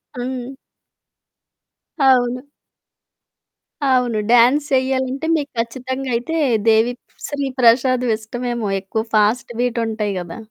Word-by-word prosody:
హ్మ్. 255 +1 -5 1.5
అవును. 255 0 +2 1.4
అవును. 250 -4 +2
డాన్స్ 255 +5 +5
చెయ్యాలంటే 260 +2 0
మీకు 290 -2 -3
ఖచ్చితంగా 260 +3 -4
అయితే 245 +8 -3 0.3
'దేవి 225 +2 +4 0.3
శ్రీ 285 -1 -3
ప్రసాద్' 250 +1 +4
ఇష్టమేమో 235 0 -4
ఎక్కువ 220 +3 -3
ఫాస్ట్ 215 +4 +2
బీట్ 245 -1 0
ఉంటాయి 210 -2 -2
గదా! 170 -1 -8
245 Hz, 95 wpm, -19 LUFS, 230-260 Hz, 1.5 s, డాన్స్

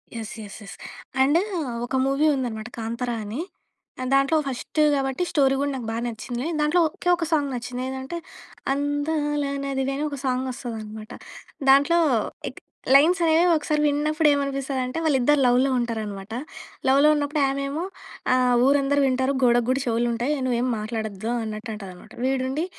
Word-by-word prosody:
Yes. 225 -2 -5
Yes. 205 - -9
Yes. 195 - -9 0.5
And, 285 +5 +4 0.5
ఒక 255 - -4
movie 275 +3 +2
ఉందనమాట 230 -4 -3
'కాంతరా' 235 +2 -3
అనీ. 210 +6 -5 0.6
ఆ! - - -2
దాంట్లో 275 +3 +4
ఫస్ట్ 270 +4 -4
గాబట్టి, 270 +3 0
స్టోరీ 270 -2 +3
గూడా 285 0 0
నాకు 245 -4 -5
బా - - -3
నచ్చింది. 240 +1 -5
నేను 330 -1 -2
దాంట్లో, 300 +4 +3
ఒకే 335 +3 -3
ఒక 340 -1 -3
సాంగ్ 290 -3 +2
నచ్చింది. 245 +1 -5
ఏదంటే, 265 +5 -5 0.6
అందాల 290 +1 -1 0.2
నదివే 270 0 -1
అని 295 - -1
ఒక 285 - -5
సాంగొస్తదనమాట. 235 -4 -4 0.6
దాంట్లో 285 +5 +6 0.5
ఎక్ - - -13 0.4
లైన్సనేవి 330 +2 +5
ఒకసారి 305 -1 0
విన్నప్పుడేమనిపిస్తదంటే, 285 -3 0
వాళ్ళిద్దరు 290 -1 +3
లవ్‌లో 250 +2 +3
ఉంటారనమాట. 215 -4 -4 0.6
లవ్‌లో 280 +3 +5
ఉన్నప్పుడు 295 0 0
ఆమేమో, 275 +4 -2 0.5
ఆహ్, 250 -1 +3
"ఊరందరు 285 0 +3
వింటారు, 260 +1 +1
గోడకు 240 -1 +4
గూడ 260 - +2
చెవులుంటాయి. 240 +3 0
నువ్వేం 245 0 +1
మాట్లాడొద్దు" 220 0 -4
అన్నట్టు 220 +1 -5
అంటదనమాట. 185 -4 -11
వీడుండి 265 +4 0
265 Hz, 135 wpm, -24 LUFS, 240-290 Hz, 0.6 s, దాంట్లో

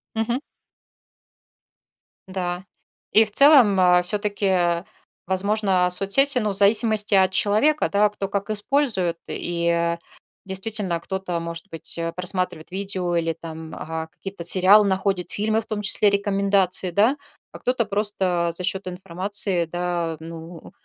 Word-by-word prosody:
Мгм. 230 +3 -1 1.9
Да. 185 -1 -4 0.5
И 220 - +6
в 210 - -7
целом, 255 -6 +5
э, 180 -1 +5
всё-таки, 190 -3 0 0.4
возможно, 190 -1 +1
соцсети 250 +9 +4
ну, 215 -3 -1
в - - -4
зависимости 210 +1 +3
от 190 -1 +4
человека, 215 +11 +2
да, 210 +1 +3
кто 200 -1 -5
как 200 +1 -4
использует. 210 - +1
И 170 0 -1 0.5
действительно, 190 -2 -3
кто-то, 190 -1 -4
может 170 +2 -7
быть, 165 0 -2
э, 165 0 -3
просматривает 180 -3 -4
видео 190 -2 -2
или, 165 -1 0
а, - - -8
там 160 0 -7
какие-то 195 -3 -9
сериалы 190 +4 +5
находит, 190 -1 -1
фильмы, 220 +2 -1
в - - -12
том 215 -2 -4
числе 205 +1 +3
рекомендации, 195 -2 0
да, 220 +10 +2 0.3
а - - -11
кто-то 250 -2 0
просто 195 -4 -1
за 180 - -6
счёт 190 +1 -3
информации, 185 0 0
да, 175 -1 -3
ну, 165 +1 -10
190 Hz, 130 wpm, -22 LUFS, 175-210 Hz, 1.9 s, И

